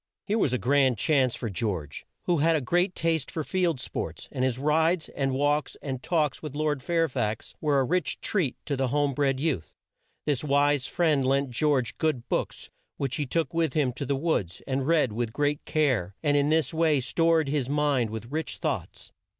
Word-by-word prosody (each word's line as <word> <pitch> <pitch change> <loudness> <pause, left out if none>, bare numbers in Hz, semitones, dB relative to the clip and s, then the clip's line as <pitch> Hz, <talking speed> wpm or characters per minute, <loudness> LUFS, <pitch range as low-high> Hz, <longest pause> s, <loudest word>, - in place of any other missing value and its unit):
Here 215 +2 0
was 145 - +2
a 125 - +1
grand 130 -1 +3
chance 130 0 +2
for 120 - -4
George, 90 - -4 0.2
who 175 - +1
had 165 +2 +3
a - - +2
great 175 +8 +1
taste 165 -4 0
for 160 - -3
field 175 -4 0
sports, - - -5
and 130 - -2
his 130 -2 +1
rides, 160 +4 +1
and 135 -1 -1
walks, 145 +2 0
and 130 -3 -5
talks 155 -3 0
with 150 -3 -7
Lord 150 -2 0
Fair 165 +3 +1
fax 110 -5 -3
were 145 -3 +2
a - - +3
rich 180 +7 0
treat 170 - -1
to 145 - -1
the 135 0 0
home 145 +2 +1
bred 135 -1 +1
youth. 140 - -2 0.5
This 145 -3 0
wise 145 -1 +2
friend 155 -6 +2
lent 135 0 +1
George 135 -2 0
good 140 -7 0
books - - -3 0.3
which 140 -1 -2
he 145 -3 -2
took 160 0 -1
with 165 -4 +1
him 140 -5 +1
to 135 +2 -5
the 140 - +1
woods 135 - -1
and 135 0 -1
read 155 -9 +3
with 115 0 -2
great 145 +3 0
care, 125 - +1
and 145 -2 +3
in 145 0 +3
this 160 +1 +1
way 160 -3 +3
stored 165 +4 +2
his 140 -3 -1
mind 145 -5 +1
with 110 +3 -7
rich 160 +1 -3
thoughts. - - -4
145 Hz, 200 wpm, -27 LUFS, 130-155 Hz, 0.5 s, grand